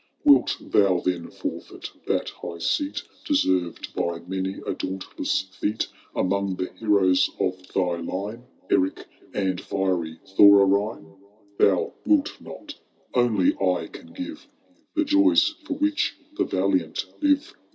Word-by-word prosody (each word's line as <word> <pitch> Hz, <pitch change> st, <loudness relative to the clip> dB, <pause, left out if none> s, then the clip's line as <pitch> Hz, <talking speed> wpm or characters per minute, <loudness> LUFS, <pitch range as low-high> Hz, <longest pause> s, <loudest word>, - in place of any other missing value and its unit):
Wilt 290 Hz, -1 st, +5 dB
thou 95 Hz, -3 st, +3 dB
then 90 Hz, -2 st, -1 dB
forfeit -, -, -6 dB, 0.2 s
that -, -, 0 dB
high 85 Hz, -, -8 dB
seat 290 Hz, -, -1 dB, 0.2 s
Deserved 95 Hz, -, 0 dB
by 85 Hz, -1 st, -1 dB
many 95 Hz, +1 st, -3 dB
a -, -, -1 dB
dauntless 95 Hz, 0 st, -2 dB
feat. 95 Hz, +3 st, -3 dB, 0.3 s
Among 100 Hz, 0 st, 0 dB
the 90 Hz, -, -4 dB
heroes 100 Hz, -4 st, +3 dB
of 90 Hz, 0 st, -2 dB
thy 90 Hz, -2 st, 0 dB
line, 100 Hz, +8 st, -5 dB, 0.3 s
Eric 95 Hz, +1 st, +1 dB, 0.3 s
and 95 Hz, -2 st, 0 dB
fiery 90 Hz, -4 st, -1 dB
Thorarine? 100 Hz, -2 st, +4 dB, 0.2 s
— 100 Hz, -1 st, -32 dB
Thou 95 Hz, -3 st, +3 dB
wilt 310 Hz, -1 st, +2 dB
not. 295 Hz, -1 st, -9 dB, 0.4 s
Only 115 Hz, -7 st, +3 dB
I 90 Hz, -2 st, 0 dB
can 250 Hz, -, -11 dB
give 290 Hz, +3 st, -7 dB, 0.5 s
The 315 Hz, -, +3 dB
jojrs 305 Hz, +1 st, +4 dB
for 290 Hz, -, -2 dB
which 300 Hz, +1 st, 0 dB, 0.2 s
the -, -, +1 dB
valiant -, -, 0 dB, 0.2 s
live. 290 Hz, -1 st, +2 dB
100 Hz, 130 wpm, -25 LUFS, -, 0.5 s, Wilt